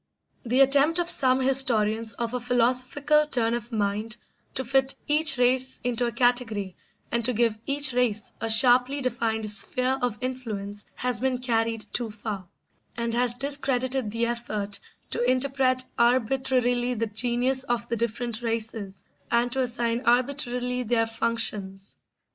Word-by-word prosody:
The 250 Hz, +2 st, +2 dB
attempt 280 Hz, +4 st, +4 dB
of 350 Hz, 0 st, +3 dB
some 260 Hz, -5 st, +3 dB
historians 230 Hz, -5 st, +2 dB
of 235 Hz, +2 st, -4 dB
a 250 Hz, -, -1 dB
philosophical 255 Hz, +5 st, +1 dB
turn 235 Hz, -5 st, 0 dB
of 240 Hz, 0 st, -5 dB
mind 215 Hz, +1 st, -2 dB, 0.4 s
to 260 Hz, -, -1 dB
fit 270 Hz, +2 st, +1 dB
each 300 Hz, -2 st, +3 dB
race 255 Hz, +1 st, +2 dB
into 245 Hz, 0 st, 0 dB
a -, -, -2 dB
category 230 Hz, -6 st, 0 dB, 0.4 s
and 235 Hz, 0 st, 0 dB
to 250 Hz, +2 st, +1 dB
give 230 Hz, -1 st, +1 dB
each 280 Hz, -1 st, +1 dB
race 230 Hz, -4 st, -1 dB
a 225 Hz, -, -2 dB
sharply 250 Hz, +4 st, +4 dB
defined 225 Hz, -3 st, -1 dB
sphere 255 Hz, +6 st, +1 dB
of 245 Hz, -3 st, -1 dB
influence 215 Hz, -6 st, -5 dB
has 250 Hz, -4 st, -1 dB
been 260 Hz, 0 st, 0 dB
carried 230 Hz, -3 st, -1 dB
too 240 Hz, -2 st, -1 dB
far, 210 Hz, -3 st, -6 dB, 0.5 s
and 235 Hz, 0 st, -2 dB
has 240 Hz, 0 st, +3 dB
discredited 265 Hz, -3 st, 0 dB
the 230 Hz, +2 st, -1 dB
effort 215 Hz, -4 st, -3 dB, 0.3 s
to -, -, -1 dB
interpret 255 Hz, 0 st, +1 dB, 0.2 s
arbitrarily 245 Hz, 0 st, +1 dB
the 230 Hz, 0 st, -1 dB
genius 245 Hz, +4 st, 0 dB
of 240 Hz, -2 st, -2 dB
the 235 Hz, -, -1 dB
different 235 Hz, 0 st, -3 dB
races 225 Hz, -4 st, -4 dB, 0.3 s
and 235 Hz, +1 st, +1 dB
to 265 Hz, +1 st, 0 dB
assign 240 Hz, -1 st, -1 dB
arbitrarily 250 Hz, 0 st, 0 dB
their 230 Hz, -1 st, +1 dB
functions. 220 Hz, -4 st, -1 dB
240 Hz, 145 wpm, -25 LUFS, 225-255 Hz, 0.5 s, attempt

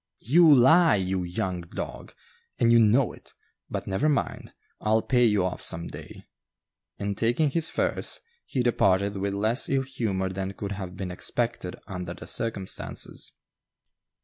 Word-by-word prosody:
"You 160 Hz, +6 st, +6 dB
lie, 155 Hz, +5 st, +6 dB
you 95 Hz, -1 st, -1 dB
young 90 Hz, 0 st, -3 dB
dog, 85 Hz, -, -7 dB, 0.4 s
and 115 Hz, -1 st, +3 dB
you 120 Hz, -, +7 dB
know 115 Hz, +3 st, +4 dB
it; -, -, -17 dB, 0.3 s
but -, -, -4 dB
never 100 Hz, +10 st, +1 dB
mind, 145 Hz, -, -2 dB, 0.3 s
I'll 110 Hz, +1 st, +2 dB
pay 125 Hz, -1 st, +3 dB
you 105 Hz, -5 st, +3 dB
off 90 Hz, -, -3 dB
some 85 Hz, +1 st, -3 dB
day"; -, -, -11 dB, 0.7 s
and 100 Hz, 0 st, -3 dB
taking 120 Hz, +8 st, +1 dB
his 165 Hz, +1 st, +2 dB
furs, -, -, -1 dB, 0.3 s
he 130 Hz, -, -1 dB
departed 100 Hz, -4 st, +2 dB
with 100 Hz, 0 st, -2 dB
less 110 Hz, +5 st, +2 dB
ill 135 Hz, -1 st, +1 dB
humor 105 Hz, -8 st, -2 dB
than 95 Hz, +1 st, -4 dB
could 100 Hz, +1 st, -6 dB
have 95 Hz, -2 st, -6 dB
been 95 Hz, -2 st, -4 dB
expected 115 Hz, 0 st, -2 dB
under 90 Hz, -3 st, -6 dB
the -, -, -10 dB
circumstances. 100 Hz, -5 st, -4 dB
105 Hz, 150 wpm, -26 LUFS, 95-120 Hz, 0.7 s, you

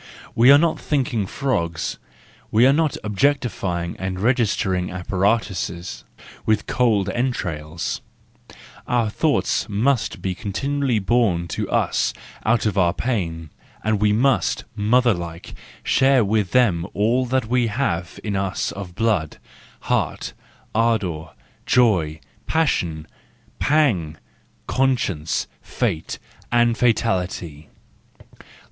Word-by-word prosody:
We 120 Hz, +4 st, +6 dB
are 140 Hz, -, +9 dB
not 165 Hz, +2 st, +1 dB
thinking 120 Hz, -8 st, -1 dB
frogs, 85 Hz, -, -2 dB, 0.5 s
we 115 Hz, +3 st, +4 dB
are 135 Hz, -, +6 dB
not 155 Hz, 0 st, +1 dB
objectifying 100 Hz, -7 st, 0 dB
and 95 Hz, 0 st, -3 dB
registering 105 Hz, -5 st, +1 dB
apparatuses 90 Hz, -1 st, -1 dB, 0.4 s
with 110 Hz, -2 st, +1 dB
cold 110 Hz, -6 st, +2 dB
entrails,—our 110 Hz, +2 st, -4 dB
thoughts 150 Hz, -2 st, +1 dB
must 110 Hz, 0 st, 0 dB
be 95 Hz, +1 st, -2 dB
continu¬ 135 Hz, +9 st, -3 dB
ally 130 Hz, -5 st, +2 dB
born 100 Hz, -5 st, +1 dB
to -, -, -3 dB
us -, -, +1 dB, 0.3 s
out 115 Hz, +1 st, +2 dB
of 100 Hz, -2 st, +1 dB
our 85 Hz, -2 st, +3 dB
pain, 85 Hz, -, -2 dB, 0.3 s
and 110 Hz, -1 st, 0 dB
we 105 Hz, -1 st, +4 dB
must, 110 Hz, -3 st, +2 dB
motherlike, 105 Hz, -7 st, 0 dB, 0.3 s
share 135 Hz, -3 st, +4 dB
with 105 Hz, -2 st, +1 dB
them 100 Hz, -9 st, +2 dB
all 120 Hz, +5 st, +2 dB
that 130 Hz, -1 st, +1 dB
we 120 Hz, +1 st, +1 dB
have 100 Hz, -7 st, -2 dB
in 105 Hz, -2 st, -2 dB
us 95 Hz, -1 st, -1 dB
of 95 Hz, -3 st, -8 dB
blood, 105 Hz, -8 st, 0 dB, 0.4 s
heart, -, -, -1 dB, 0.4 s
ardour, 105 Hz, -8 st, 0 dB, 0.4 s
joy, 90 Hz, -11 st, +3 dB, 0.3 s
passion, 85 Hz, -, 0 dB, 0.5 s
pang, 110 Hz, -, +2 dB, 0.5 s
conscience, 120 Hz, -12 st, 0 dB, 0.2 s
fate 80 Hz, 0 st, -2 dB, 0.3 s
and 120 Hz, -1 st, +3 dB
fatality. 90 Hz, -, -1 dB
105 Hz, 105 wpm, -22 LUFS, 90-125 Hz, 0.5 s, are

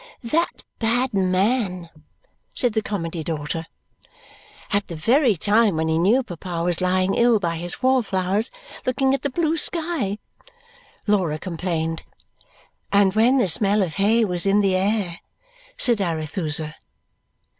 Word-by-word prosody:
"That 315 Hz, +9 st, -1 dB, 0.2 s
bad 245 Hz, +2 st, 0 dB
man!" 185 Hz, -1 st, 0 dB, 0.6 s
said 245 Hz, -3 st, +1 dB
the 220 Hz, -, +1 dB
Comedy 170 Hz, -6 st, -4 dB
daughter. 160 Hz, +1 st, -4 dB, 1.1 s
"At 205 Hz, 0 st, 0 dB
the 170 Hz, -, -7 dB
very 235 Hz, -, +3 dB
time 205 Hz, +2 st, +2 dB
when 160 Hz, 0 st, -1 dB
he 160 Hz, 0 st, +1 dB
knew 220 Hz, +10 st, +3 dB
papa 175 Hz, -4 st, -5 dB
was 175 Hz, 0 st, +1 dB
lying 185 Hz, +1 st, +1 dB
ill 235 Hz, -1 st, +4 dB
by 170 Hz, -4 st, -2 dB
his 175 Hz, +8 st, -5 dB
wallflowers, 210 Hz, -5 st, +1 dB, 0.3 s
looking 265 Hz, +1 st, +1 dB
at 275 Hz, -, -1 dB
the 285 Hz, -, -1 dB
blue 325 Hz, +3 st, 0 dB
sky," 315 Hz, -, -1 dB, 0.9 s
Laura 185 Hz, -7 st, +1 dB
complained. 165 Hz, -1 st, -3 dB, 0.9 s
"And 200 Hz, -1 st, +4 dB
when 235 Hz, +5 st, +4 dB
the 245 Hz, -, +2 dB
smell 200 Hz, +4 st, +3 dB
of 170 Hz, -4 st, -4 dB
hay 220 Hz, +3 st, +3 dB
was 180 Hz, -1 st, 0 dB
in 200 Hz, +1 st, +4 dB
the 195 Hz, -2 st, +2 dB
air!" 190 Hz, -3 st, -1 dB, 0.6 s
said 235 Hz, -5 st, +3 dB
Arethusa. 155 Hz, -2 st, -2 dB
195 Hz, 135 wpm, -22 LUFS, 170-230 Hz, 1.1 s, ill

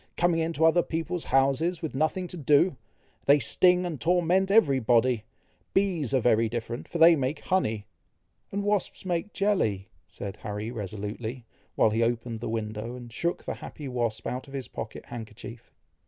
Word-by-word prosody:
coming 175 Hz, -1 st, +2 dB
into 160 Hz, -1 st, +1 dB
other 165 Hz, +2 st, +5 dB
people's 165 Hz, +1 st, -3 dB
houses, 140 Hz, +6 st, +2 dB
with 160 Hz, -, -3 dB
nothing 155 Hz, +6 st, 0 dB
to 180 Hz, -, -6 dB
do! 150 Hz, +2 st, +3 dB, 0.5 s
They 140 Hz, +1 st, +7 dB
sting 180 Hz, +7 st, +4 dB
and 165 Hz, -6 st, -4 dB
torment 180 Hz, +3 st, +2 dB
every 160 Hz, -11 st, +5 dB
body! 120 Hz, -1 st, +2 dB, 0.5 s
Bees 180 Hz, -, +1 dB
are 135 Hz, -, +3 dB
very 115 Hz, -2 st, +3 dB
different, 120 Hz, +1 st, -5 dB
for -, -, -4 dB
they 165 Hz, +1 st, +8 dB
make 140 Hz, +1 st, -2 dB
honey." 110 Hz, -, 0 dB, 0.7 s
"And 200 Hz, +1 st, -2 dB
wasps 205 Hz, -2 st, -1 dB
make 180 Hz, +3 st, -2 dB
jelly!" 110 Hz, -, 0 dB, 0.2 s
said 100 Hz, 0 st, -7 dB
Harry 105 Hz, +1 st, -5 dB
resolutely, 110 Hz, +3 st, -5 dB, 0.3 s
while 110 Hz, -, +4 dB
he 110 Hz, +2 st, +1 dB
opened 115 Hz, 0 st, -1 dB
the 115 Hz, -, -4 dB
window, 110 Hz, +1 st, -4 dB
and 120 Hz, -2 st, -10 dB
shook 170 Hz, +8 st, -2 dB
the -, -, -3 dB
happy 150 Hz, -3 st, -8 dB
wasp 120 Hz, -4 st, -2 dB
out 130 Hz, +3 st, -4 dB
of 140 Hz, -, -9 dB
his 135 Hz, -2 st, -4 dB
pocket 110 Hz, -, -7 dB
handkerchief. 115 Hz, +1 st, -9 dB
Mrs. -, -, -42 dB
135 Hz, 170 wpm, -27 LUFS, 115-170 Hz, 0.7 s, they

